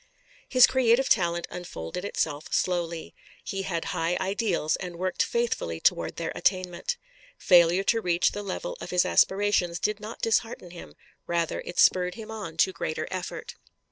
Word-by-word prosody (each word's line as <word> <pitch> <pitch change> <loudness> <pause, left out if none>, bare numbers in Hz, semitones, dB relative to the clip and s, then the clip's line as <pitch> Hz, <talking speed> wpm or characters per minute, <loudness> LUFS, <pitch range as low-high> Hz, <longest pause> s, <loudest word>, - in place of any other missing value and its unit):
His 255 -2 +8
creative 255 0 +3
talent 175 -3 +2
unfolded 175 - -6
itself 155 -7 -2
slowly. 170 -2 -1 0.3
He 195 -2 -3
had 170 -4 -3
high 165 +2 0
ideals 190 -5 0
and 180 -2 -6
worked 185 +1 -1
faithfully 230 - -1
toward - - +1
their - - -3
attainment. 185 - -1 0.4
Failure 175 +1 +5
to 225 +2 +2
reach 175 -1 +2
the 205 - -5
level - - -4
of - - -6
his 180 0 +2
aspirations 190 -3 +2
did 210 +2 -1
not 215 +2 -8
dishearten 225 -5 0
him; 175 - -11 0.3
rather 170 -1 -1
it 175 - -7
spurred 180 -1 +4
him 220 -1 -8
on 195 -8 -7
to 190 +3 +3
greater 155 -2 -3
effort. 185 -1 -5
180 Hz, 155 wpm, -27 LUFS, 170-210 Hz, 0.4 s, His